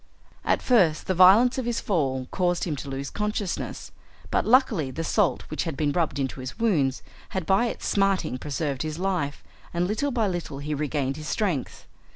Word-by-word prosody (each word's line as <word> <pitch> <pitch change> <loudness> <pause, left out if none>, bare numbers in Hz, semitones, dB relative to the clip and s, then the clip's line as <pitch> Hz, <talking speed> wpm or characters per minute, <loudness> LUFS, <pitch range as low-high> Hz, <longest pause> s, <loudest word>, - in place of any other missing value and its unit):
At - - +1
first 185 -11 +3
the 185 - 0
violence 200 +9 +6
of 255 - -3
his 235 -1 0
fall 135 -9 0
caused 175 -2 0
him 160 -4 -1
to 140 - -6
lose 135 0 -4
consciousness, 210 -2 -3 0.4
but - - +1
luckily 225 - +3
the 160 +5 -4
salt 195 +1 +1
which 155 - -2
had 160 -5 -4
been 145 -1 +1
rubbed 160 -4 0
into 135 -1 -2
his 130 0 -6
wounds 160 - +1 0.3
had 190 -3 -3
by 195 +7 +3
its - - -5
smarting 195 -9 +1
preserved 140 -1 -3
his 155 0 -3
life, 180 -6 -2 0.3
and 175 +1 +1
little 220 +9 0
by 235 -5 +1
little 175 -6 -4
he 145 +2 -4
regained 145 -2 -1
his 155 0 -7
strength. 180 - -2
170 Hz, 190 wpm, -26 LUFS, 140-200 Hz, 0.4 s, violence